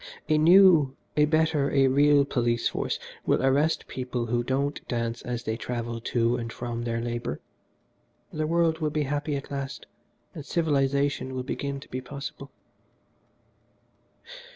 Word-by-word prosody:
A 155 -1 +3
new, 165 -5 +6 0.2
a 150 - +5
better, 155 -2 +2
a 135 -1 +3
real 140 +1 +4
police 120 -3 0
force - - -2 0.3
will - - +1
arrest 145 +4 +2
people 125 -2 -3
who 120 +1 0
don't 140 +3 -1
dance 115 -1 -2
as 120 -1 -4
they 110 - -2
travel 115 -1 -4
to 120 0 +1
and 115 -1 -5
from 120 -1 -5
their 115 -1 -1
labour. 120 -11 -3 0.9
The 155 0 -1
world 165 -1 +2
will 155 -2 0
be 150 0 -1
happy 145 +1 -2
at 140 0 -6
last, 140 -1 -5 0.5
and 155 - -7
civilisation 140 -4 0
will 130 - -2
begin 140 +1 -4
to - - -14
be 130 - -4
possible." 140 +3 -8
135 Hz, 150 wpm, -26 LUFS, 120-150 Hz, 0.9 s, new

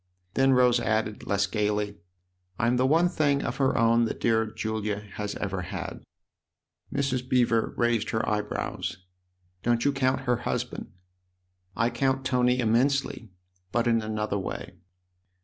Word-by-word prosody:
Then 135 0 +4
Rose 125 -1 +4
added, 110 -2 -1
less 100 0 +2
gaily: 105 0 -1 0.3
" 90 0 -39
I'm 120 +1 +2
the 130 +1 +3
one 165 +5 +4
thing 145 -5 +1
of - - -3
her 135 -1 +2
own 115 +1 +4
that - - -4
dear 110 -1 +2
Julia 110 -1 -3 0.2
has 105 -1 -4
ever 95 -2 -3
had." 85 - -6 0.9
Mrs. 130 -2 -1
Beever 120 -3 +2
raised 120 -2 +1
her 110 - -1
eyebrows. 105 0 -2 0.3
" 90 0 -43
Don't 120 -1 +1
you 145 - +4
count 130 -1 +1
her 125 -2 +1
husband? - - -4 0.3
" 90 0 -48
" 90 - -48
I 115 +2 +1
count 135 +2 0
Tony 125 -1 +2
immensely; 120 0 +1 0.4
but 120 0 +1
in 115 -1 +3
another 105 -1 -2
way." 95 -1 -6
115 Hz, 155 wpm, -27 LUFS, 105-125 Hz, 0.9 s, Then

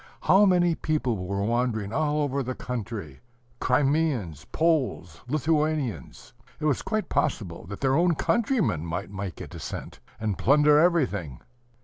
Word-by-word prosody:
How 195 +2 +5
many 175 -2 +3
people 125 - -1
were 100 +1 -1
wandering 115 -2 -1
all 150 0 +1
over 140 -1 -1
the 130 -1 -4
country, 110 - -6 0.4
Crimeans, 130 - 0
Poles, 140 - 0
Lithuanians! 150 -3 -1 0.3
It - - -3
was 145 -4 +1
quite 215 -1 -2
possible 110 - -2
that 100 +1 -8
their 135 -1 +2
own 170 +3 +3
countrymen 225 - +1
might 90 +4 -4
make 95 -2 -6
a - - -6
descent, - - -7 0.2
and 105 -3 -2
plunder 150 +2 +5
everything. 125 - +1
130 Hz, 135 wpm, -26 LUFS, 100-155 Hz, 0.4 s, How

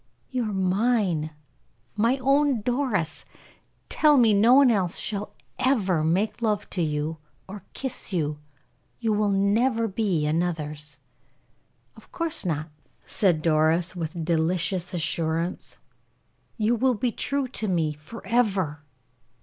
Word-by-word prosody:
"You 250 -2 -1
are - - -4
mine, 190 -4 +1 0.7
my 230 +5 +2
own 275 -2 +3
Doris! 240 - -1 0.6
Tell 300 -2 +4
me, 230 -4 +5
no 225 +5 +6
one 275 -2 +6
else 185 -6 0
shall 205 -1 -4 0.2
ever 195 - +2
make 190 +9 0
love 215 -3 0
to 180 - -2
you, 155 0 -2 0.3
or 195 -1 -9
kiss 265 -5 -4
you 150 -5 -1 0.6
you 225 -2 0
will 210 0 +1
never 225 +4 +2
be 190 -7 0
another's?" 150 -3 -2 1.0
"Of - - -18
course 335 -1 -3
not," 155 -1 -2 0.3
said 175 -6 +1
Doris, 165 +3 +2
with 165 -1 -4
delicious 175 +2 0
assurance. 165 +2 -2 0.8
"You 220 +1 +2
will 255 +2 +2
be 240 +3 -1
true 275 +4 -2
to 220 -3 -2
me 165 -5 0
forever." 190 -1 -1
195 Hz, 125 wpm, -25 LUFS, 160-230 Hz, 1.0 s, no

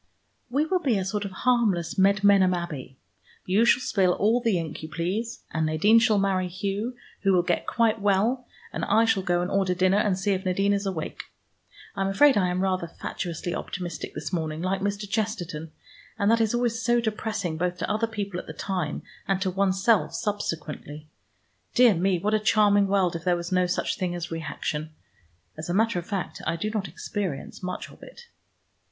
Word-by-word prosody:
"We 280 +5 +1
will 365 +3 +1
be 265 - +1
a 190 - -1
sort 205 +1 -2
of 195 - -5
harmless 220 -7 +1
Medmenham 195 -1 +5
Abbey. 150 -7 -6 0.5
You 200 +5 +3
shall 245 - +4
spill 190 -7 +2
all 225 +6 +2
the 225 -6 +2
ink 160 -2 -5
you 155 - -7
please, 195 +9 -3
and 160 0 0
Nadine 200 +9 +5
shall 225 -3 +3
marry 190 -2 +1
Hugh, 200 +6 -3 0.3
who 195 - +3
will 180 -1 +4
get 175 -1 -1
quite 225 -2 +1
well, 215 +6 +1 0.3
and - - -3
I 225 +1 +4
shall 220 -4 +2
go 175 -1 +1
and 180 - -3
order 190 -2 +1
dinner 185 +2 +3
and 205 -3 +1
see 195 +2 0
if 190 -1 -1
Nadine 195 +2 +1
is 200 0 -1
awake. 165 -5 -4 0.7
I 195 - -3
am 195 - +1
afraid 265 +8 +5
I 185 -3 +3
am 180 +1 -1
rather 185 -3 0
fatuously 170 +1 -5
optimistic 175 -2 -5
this - - -5
morning, 160 -2 -2
like 190 +1 -1
Mr. 205 +1 -2
Chesterton, 180 -7 -3 0.5
and 200 +2 +3
that 230 0 +3
is 225 +1 +1
always 235 -2 0
so 240 +1 +3
depressing, 215 -6 -2
both 180 +1 -1
to - - -3
other 220 +2 +1
people 200 -4 -4
at - - -9
the - - -6
time, 180 -6 -3 0.2
and 195 -1 +1
to 190 - 0
oneself 195 +3 +2
subsequently. 155 -7 -4 0.7
Dear 245 -3 +7
me, 185 +1 +1
what 205 +5 -1
a 215 - +4
charming 205 -1 +4
world 190 -3 +2
if 165 - -5
there 175 -1 +2
was 170 +1 -6
no 180 -1 +3
such 175 - -1
thing 180 -1 -1
as 175 -1 -5
reaction. 155 -1 -4 0.6
As 155 +2 -7
a 175 - 0
matter 225 -2 +2
of 170 - -9
fact 195 -3 -4
I 165 - +1
do 210 +6 -3
not 210 -3 -2
experience 175 -2 -5
much 185 0 -5
of - - -17
it." - - -12
195 Hz, 200 wpm, -26 LUFS, 175-215 Hz, 0.7 s, Dear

